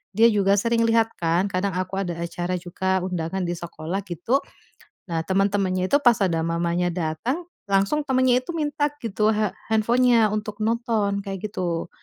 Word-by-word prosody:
dia 225 +3 +6
juga 200 -1 +3
sering 230 +2 +1
lihat 225 0 +3
kan, 170 +3 +1
kadang 190 +2 0
aku 185 +1 -3
ada 180 -3 -2
acara 175 +1 -3
juga, 190 +2 -1
undangan 180 0 -2
di - - -1
sekolah 170 +2 -5
gitu, 180 - 0 0.7
nah 165 -1 -1
teman-temannya 190 -1 +1
itu 285 - +5
pas 240 -3 +5
ada 165 -4 +1
mamanya 170 +1 0
datang 180 - -2 0.2
langsung 200 +9 +1
temannya 255 -2 +2
itu 300 - -5
minta 295 -2 0
gitu, 215 -1 +1
ha 215 -1 -1 0.2
handphone-nya 230 0 +4
untuk 210 0 -4
nonton, 220 -3 0
kayak 195 +1 -4
gitu. 175 -4 -3
195 Hz, 160 wpm, -24 LUFS, 175-230 Hz, 0.7 s, dia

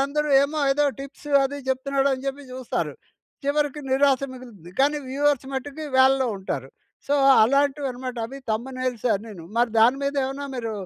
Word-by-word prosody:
వీళ్ళందరూ 300 +2 0
ఏమో 295 +2 -2
ఏదో 295 +1 +2 0.2
టిప్స్ 275 +2 -10 0.2
అది 285 +1 -3
చెప్తున్నాడు 275 +1 +1
అని 260 +1 -9
చెప్పి 275 +1 -3
చూస్తారు. 255 -2 -3 0.5
చివరికి 295 0 0
నిరాశ 270 0 +3
మిగులుతుంది. 225 -9 -12
కానీ 295 +2 +3
వ్యూవర్స్ 280 -1 +1
మట్టుకు 290 +3 -5
వేలల్లో 265 0 +5
ఉంటారు. 135 -8 -4 0.4
సో, 285 - +1 0.3
అలాంటివి 280 +3 +2
అన్నమాట. 255 0 -6
అవి 270 +3 -9
థంబ్‌నెయిల్స్ 250 +1 -2
అనీను 205 -5 -10
మరి 240 -1 +3
దాని 245 +4 +5
మీదేమన్నా 280 0 -2
మీరు 230 -2 -3
270 Hz, 150 wpm, -24 LUFS, 250-285 Hz, 0.5 s, వేలల్లో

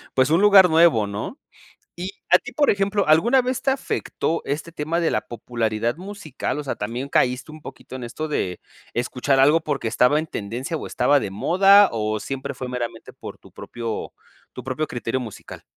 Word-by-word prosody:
pues, 130 +1 +3
un 165 +3 +4
lugar 200 -3 +7
nuevo, 160 -10 +4
¿no? 105 - -5 0.6
Y 180 +2 -5 0.2
a - - +7
ti, - - -10
por 290 -1 +3
ejemplo, 200 0 0
¿alguna 235 +13 +4
vez 255 0 -2
te 270 - +1
afectó 265 - -2
este 155 +4 -4
tema 160 +2 -2
de 165 - +1
la - - 0
popularidad 115 0 -2
musical? 185 -8 -5
O 150 - -5
sea, 135 - -2
¿también 120 +6 -5
caíste 125 +4 +1
un 155 - -11
poquito 130 - -10
en 130 - -8
esto 155 +6 -5
de 90 -11 -2 0.3
escuchar 130 +2 0
algo, 150 +5 +5
porque, 145 -7 -2
estaba 125 +6 +3
en 160 - -3
tendencia 120 - -5
o - - -7
estaba 145 -1 +2
de 100 - -4
moda 195 - +5
o 110 -1 -1
siempre 135 +4 -5
fue 125 0 -6
meramente, 120 -2 -5
por - - -10
tu - - -19
propio 115 -2 -6 0.4
tu 125 - -8
propio 135 +4 -2
criterio 120 +1 -3
musical? 115 -5 -9
140 Hz, 190 wpm, -22 LUFS, 120-170 Hz, 0.6 s, lugar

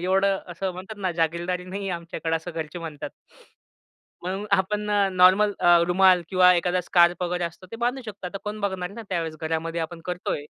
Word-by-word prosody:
एवढं 195 +2 +2
असं 185 +2 -3
म्हणतात 185 +4 -9
ना, 185 -2 -1
जहारगिररदारी 170 +2 -1
नाहीये 195 +1 -4
आमच्याकडे 170 -1 -3
असं 165 +2 -7
घरचे 165 +1 -5
म्हणतात. 160 -3 -6 1.1
म्हणून 190 +3 -3
आपण 210 +2 +1
अ, 205 -1 +3
नॉर्मल 185 +3 +5
अ, 175 0 +6
रुमाल 185 0 +5
किंवा 185 -1 +6
एखादा 180 +1 +1
स्कार्फ 175 0 +3
वगैरे 180 0 -1
असतो 170 +2 -7
ते - - -6
बांधू 245 +3 -1
शकतो. 200 -3 -7
आता 195 +2 -6
कोण 210 +1 -5
बघणार 190 -3 -2
आहे 200 - -13
ना 230 - -7
त्यावेळेस 165 -4 -2
घरामध्ये, 165 +1 -2
आपण 165 +1 -5
करतोय. 180 -4 -3
180 Hz, 185 wpm, -25 LUFS, 170-195 Hz, 1.1 s, अ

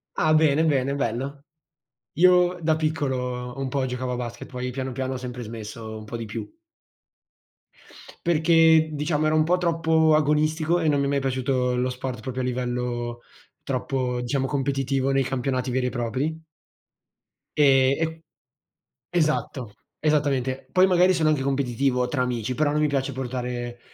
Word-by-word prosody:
Ah 155 0 +2
bene, 155 -1 +4
bene, 140 -3 +1
bello. 135 +2 -3 0.8
Io 180 0 +5
da 160 0 +3
piccolo 130 -6 -2
un 135 -1 -2
po' 135 +1 -1
giocavo 125 0 -3
a - - -2
basket, 120 -1 -6
poi 125 0 -4
piano 130 +1 -4
piano 130 +1 -3
ho - - -3
sempre 125 -1 -6
smesso, 110 0 -7
un 110 - -10
po' 110 +2 -6
di 115 - -5
più. 105 - -5 1.8
Perché 160 -1 +4
diciamo 150 +1 -1
era 155 0 +2
un 155 - +4
po' 175 +3 +2
troppo 160 -2 +2
agonistico 155 +2 +2
e 160 - 0
non 145 -1 +2
mi 140 - +1
è - - 0
mai 140 0 +1
piaciuto 130 -1 0
lo 125 +1 0
sport 125 -1 -5
proprio 130 +1 -4
a - - -2
livello 120 -1 -3 0.4
troppo 130 -1 -2
diciamo 135 +2 -1
competitivo 135 -1 0
nei 135 0 +2
campionati 130 0 -2
veri 125 0 0
e - - 0
propri. 130 +7 -3 1.1
Ehm, 135 0 +4
e 160 0 -10 0.9
esatto, 150 -8 -1 0.3
esattamente. 140 -4 0
Poi 185 0 +5
magari 180 0 +4
sono 160 -3 +2
anche 150 -3 +1
competitivo 135 -1 0
tra 125 +1 -1
amici, 125 -1 -2
però 150 +1 +1
non 150 - 0
mi 150 - +3
piace 140 -2 -1
portare 125 -1 -4
135 Hz, 160 wpm, -24 LUFS, 125-155 Hz, 1.8 s, Io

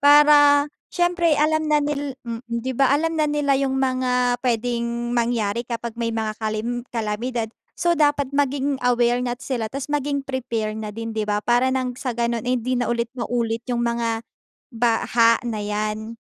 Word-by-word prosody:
para 290 0 +7 0.2
siyempre 350 -3 +2
alam 310 +1 +2
na 300 - +4
nil 285 -2 -3
mm, 230 -1 -5
'di 235 +2 -2
ba. 265 +1 +3
Alam 320 +2 +1
na 300 - +2
nila 295 -1 +1
yung 265 -1 0
mga 250 -2 +1
pwedeng 235 0 -1
mangyari 235 -2 0
kapag 235 -1 -4
may 230 - 0
mga 220 -1 -2
kalem 220 +3 -2
kalamidad. 225 +1 -2 0.3
So, 345 0 +2
dapat 290 -2 +2
maging 280 -1 0
aware 245 0 +3
na 245 +1 -3
sila 235 -5 -3
tapos 275 +3 -5
maging 285 -1 0
prepare 235 -5 -2
na 215 -1 -5
din 225 +1 -5
'di 215 -1 -1
ba, 205 0 +1
para 245 +2 +3
nang 260 -1 -1
sa 250 -3 -3
gano'n 235 -1 -1
eh, 255 - +2
hindi 250 +2 -1
na 245 - -1
ulit 235 -1 0
maulit 235 -2 -2
yung 240 -1 0
mga 230 -1 -1 0.5
baha 230 0 +3
na 225 -3 -3
yan. 215 +2 -3
245 Hz, 175 wpm, -22 LUFS, 230-275 Hz, 0.5 s, para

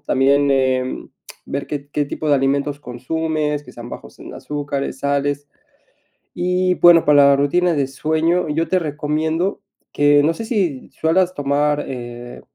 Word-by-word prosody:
También, 140 0 +2
em, 130 -1 0 0.4
ver 140 0 -4
qué 145 -1 -6
qué 145 0 0
tipo 150 +2 -4
de 145 - +5
alimentos 140 +1 0
consumes, 150 +4 -2
que - - -13
sean 120 0 -9
bajos - - -10
en - - -10
azúcares, 145 -2 -4
sales. 140 0 -1 0.9
Y, 180 +1 +1
bueno, 175 -1 +7
para 145 -1 +6
la 140 - +5
rutina 175 +5 +2
de 140 -2 +1
sueño, 160 +4 0
yo 160 +2 0
te 185 +2 +1
recomiendo 160 +4 -2 0.3
que 145 0 +4
no 160 - +2
sé 225 - -6
si 190 - -2
sueles 180 +3 +1
tomar, 145 +1 0
eh, 120 -1 -8
145 Hz, 155 wpm, -19 LUFS, 140-160 Hz, 0.9 s, bueno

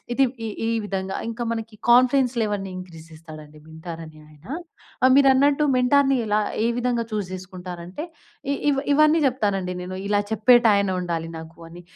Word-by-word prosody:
ఇది 275 - +4 0.2
ఈ - - -2 0.2
ఈ - - 0 0.2
విధంగా 190 -1 -3
ఇంకా 230 +1 -5
మనకి 225 -1 -5
కాన్ఫెన్స్ 255 +1 +5
లెవెల్స్‌ని 205 -3 -2
ఇంక్రీజ్ 170 -3 -10
చేస్తాడండి 155 -1 -12
మెంటార్ 160 +1 -9
అనే 155 -1 -14
ఆయన. 150 +3 -19 0.6
ఆహ్, 260 - +6
మీరన్నట్టు 280 +2 +4
మెంటార్‌ని 270 +2 +3
ఎలా 210 0 +1 0.2
ఏ - - +3
విధంగా 240 -1 0
చూజ్ 205 -4 -3
చేసుకుంటారంటే 180 - -8 0.5
ఇ - - +1 0.2
ఇ - - +2 0.2
ఇవన్నీ 305 +2 +5
చెప్తానండి 200 -8 -1
నేను. 185 +1 -6
ఇలా 205 0 +2
చెప్పేటాయన 220 -3 +4
ఉండాలి 165 -2 -3
నాకు 160 +1 -12
అని. 175 +1 -12
205 Hz, 155 wpm, -23 LUFS, 175-250 Hz, 0.6 s, ఆహ్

